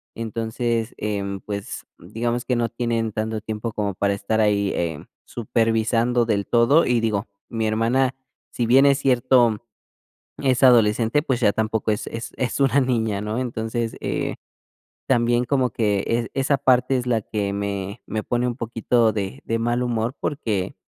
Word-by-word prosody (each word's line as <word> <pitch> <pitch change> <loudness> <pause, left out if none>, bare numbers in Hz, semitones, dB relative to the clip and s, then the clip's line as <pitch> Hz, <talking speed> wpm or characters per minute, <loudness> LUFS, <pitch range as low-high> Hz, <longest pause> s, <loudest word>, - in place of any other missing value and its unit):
Entonces, 115 +1 -2
em, 100 -2 -3
pues, 100 -1 -6
digamos 120 +6 -3
que 125 - 0
no 115 -1 0
tienen 115 -2 -1
tanto 110 +1 -3
tiempo 110 +1 -4
como 100 -2 -2
para 100 +1 +1
estar 100 +3 -1
ahí, 100 -2 +2
eh, 80 -3 -3 0.2
supervisando 115 +1 +1
del 100 -3 -1
todo 120 +8 +4
y, 120 -1 +2
digo, 105 -3 -1 0.2
mi 110 -1 -1
hermana, 120 +5 +1 0.4
si 120 - -1
bien 130 +4 +5
es 140 -1 +5
cierto, 125 -3 +3 0.8
es 130 -2 +1
adolescente, 115 +2 +4
pues, 130 -5 -1
ya 110 -4 +3
tampoco 110 0 0
es 105 - -3
es 115 -1 -6
es 130 -2 -2
una 140 0 +3
niña, 115 -5 0
¿no? 105 +2 -3
Entonces, 115 -2 -3
eh, - - -2 0.8
también 120 -1 +2
como 130 0 +1
que 105 -3 0
es 115 0 -1
esa 135 +1 +1
parte 130 0 +3
es 125 0 -3
la 115 -3 +1
que 100 -1 -3
me 100 +1 -4
me 110 0 -3
pone 120 0 -1
un 120 -1 -2
poquito 115 -1 +1
de 105 +5 -4
de 115 - 0
mal 120 +2 0
humor, 120 +1 -1
porque, 110 -11 -2
115 Hz, 165 wpm, -23 LUFS, 105-125 Hz, 0.8 s, bien